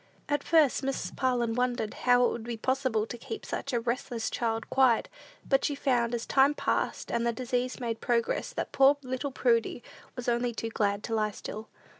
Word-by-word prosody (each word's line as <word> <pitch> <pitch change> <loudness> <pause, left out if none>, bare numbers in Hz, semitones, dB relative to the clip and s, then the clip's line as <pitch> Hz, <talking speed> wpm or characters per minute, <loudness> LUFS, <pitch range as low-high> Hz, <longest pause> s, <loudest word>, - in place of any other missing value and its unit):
At 290 -1 0
first, 315 -5 +4
Mrs. 270 0 -3
Parlin 245 -3 +1
wondered 245 -3 -1
how 245 0 +4
it - - +2
would 235 - -5
be 235 -1 -4
possible 255 -3 0
to 240 - -8
keep 435 - -7
such 275 - -4
a 240 - +1
restless 235 -1 -2
child 225 -1 -1
quiet; 260 -4 +4 0.4
but 270 - +3
she 290 - 0
found, 245 -4 +1
as 230 - -4
time 275 +2 +4
passed, - - -1
and 235 - 0
the 235 - +2
disease 250 +1 -2
made 230 -2 -3
progress, 240 - 0
that - - -3
poor 275 +1 +5
little 260 +2 -3
Prudy 235 -2 +1 0.3
was 245 - -6
only 240 0 0
too 230 - -3
glad 205 -1 0
to 230 - -4
lie 215 -1 +1
still. 215 +1 -7
245 Hz, 195 wpm, -29 LUFS, 230-265 Hz, 0.4 s, poor